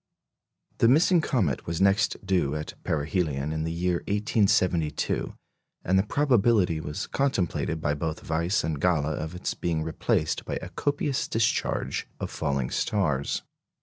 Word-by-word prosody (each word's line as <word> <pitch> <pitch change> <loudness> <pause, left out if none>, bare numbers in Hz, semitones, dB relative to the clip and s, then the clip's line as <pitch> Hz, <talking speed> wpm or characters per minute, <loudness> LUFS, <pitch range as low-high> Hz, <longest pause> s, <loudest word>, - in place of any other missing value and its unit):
The 115 - +5
missing 165 +7 +5
comet 105 - 0
was 85 0 -2
next 100 +2 +2
due 85 -7 +1
at 75 0 -5
perihelion 75 -2 -1
in 80 0 -2
the 80 - -2
year 85 +1 0
1872, 95 -7 +1 0.5
and 95 +2 +3
the - - +5
probability 115 - +2
was 75 -1 -4
contemplated 95 - -1
by 75 - 0
both 80 +2 -4
Weiss 85 +6 +1
and 75 -2 -2
Galle 85 -5 +2
of 80 +3 -5
its 90 - -2
being 80 -2 -1
replaced 80 0 0
by - - -4
a - - -5
copious 145 -1 -1
discharge 115 0 0
of - - -4
falling 70 -3 -1
stars. 75 -10 0
85 Hz, 145 wpm, -27 LUFS, 80-105 Hz, 0.5 s, The